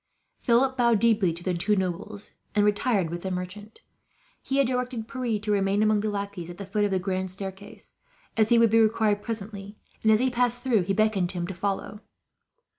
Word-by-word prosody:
Philip 260 +2 +2
bowed 235 -2 +4
deeply 220 -6 +3
to 170 +2 -7
the 185 - 0
two 195 +5 +1
nobles, 190 +2 -4 0.2
and 205 0 +4
retired 205 -4 +1
with 175 0 -4
the 190 - -3
merchant. 185 +4 -6 0.6
He 270 - -2
had 275 - +4
directed 250 -2 -2
Pierre 245 -5 -2
to 210 +1 -3
remain 200 +1 +2
among 215 -1 +3
the 215 +1 -1
lackeys 200 -4 -5
at 175 - -9
the 200 - -6
foot 205 +2 -1
of 205 - +2
the 190 - +1
grand 185 0 -2
staircase, 195 +2 -8 0.4
as 220 -1 +3
he 235 - +5
would 230 -2 +5
be 225 - +5
required 215 -2 +2
presently; 205 -2 -6 0.2
and 220 - +4
as 215 - +6
he 255 +3 +1
passed 245 0 0
through, 240 -6 +3
he 195 - 0
beckoned 215 -4 +1
to 185 - -6
him 175 - -1
to 190 - -5
follow. 200 +3 -3
210 Hz, 210 wpm, -26 LUFS, 190-225 Hz, 0.6 s, as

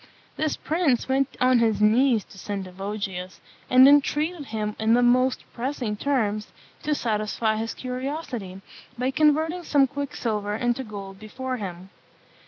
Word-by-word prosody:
This 310 -1 -1
prince 310 -7 +1
went 270 +1 0
on 255 -1 +4
his 220 -3 +2
knees 225 +1 +4
to 195 - -15
Sendivogius, 195 -1 -5 0.3
and 255 +1 +8
entreated 295 +3 +3
him 215 -3 -3
in 220 +1 +3
the 245 - +3
most 255 +1 +3
pressing 245 -3 -3
terms 215 -4 -1 0.3
to 300 - 0
satisfy 215 -2 -1
his 225 +1 -3
curiosity, 255 - -5 0.4
by 255 +2 0
converting 315 +4 +2
some 285 -4 +4
quicksilver 230 -7 -3
into 240 +2 0
gold 200 -4 -8
before 255 +4 -5
him. 185 -2 -7
240 Hz, 135 wpm, -25 LUFS, 210-275 Hz, 0.4 s, and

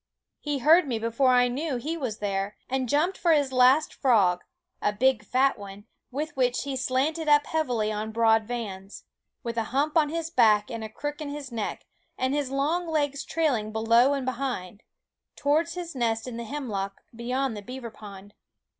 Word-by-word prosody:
He 295 -1 -2
heard 310 +5 +5
me 240 -4 -1
before 230 +4 +1
I 250 -1 +5
knew 275 +4 -2
he 295 +7 -3
was 255 -9 -4
there, 200 0 -2
and 260 -2 -1
jumped 325 +8 +1
for 335 -1 +4
his 285 -3 +2
last 260 +4 +4
frog, 195 -9 +3 0.4
a 210 - +2
big 235 +1 +2
fat 255 +3 +2
one, 200 0 -10 0.2
with 295 +3 -4
which 250 -2 +1
he 275 -1 -4
slanted 270 +5 0
up 295 0 +5
heavily 245 -9 0
on 215 +1 -3
broad 225 -1 +3
vans 205 -5 -6 0.4
with 235 -1 -4
a 225 - 0
hump 285 +6 0
on 310 -3 +4
his 330 +1 -3
back 215 -4 +4
and 230 -1 -5
a 220 - -5
crook 290 +7 -5
in 295 - -4
his 285 -2 -7
neck 225 -3 -4 0.3
and 260 +1 0
his 290 -2 -1
long 300 +6 0
legs 290 -3 -1
trailing 255 -10 0
below 230 +5 +4
and 270 -2 -3
behind 245 -7 -4 0.5
towards 315 +4 +1
his 350 -1 -5
nest 230 -2 -1
in 250 - -6
the 235 0 -5
hem 285 +2 -5
lock, 195 -2 -4
beyond 250 +1 -2
the 205 - -6
beaver 245 +1 -7
pond. 205 -1 -12
255 Hz, 190 wpm, -26 LUFS, 220-290 Hz, 0.5 s, heard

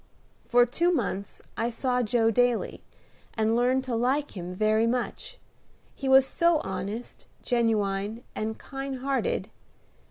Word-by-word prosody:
For 245 0 +5
two 335 +9 +1
months 200 - -3
I 230 +2 0
saw 250 +1 0
Joe 225 -1 +2
daily, 245 0 +1 0.5
and 220 0 +2
learned 250 +2 +2
to 260 -2 -4
like 260 +5 0
him 180 -1 -6
very 215 +3 +2
much, 255 - -3 0.6
he 270 - -4
was 265 0 +7
so 340 +4 +2
honest, 195 +5 -6 0.2
genuine, 220 -2 0
and 220 +1 -3
kind 270 -1 -6
hearted. 275 - -1
240 Hz, 130 wpm, -27 LUFS, 220-265 Hz, 0.6 s, was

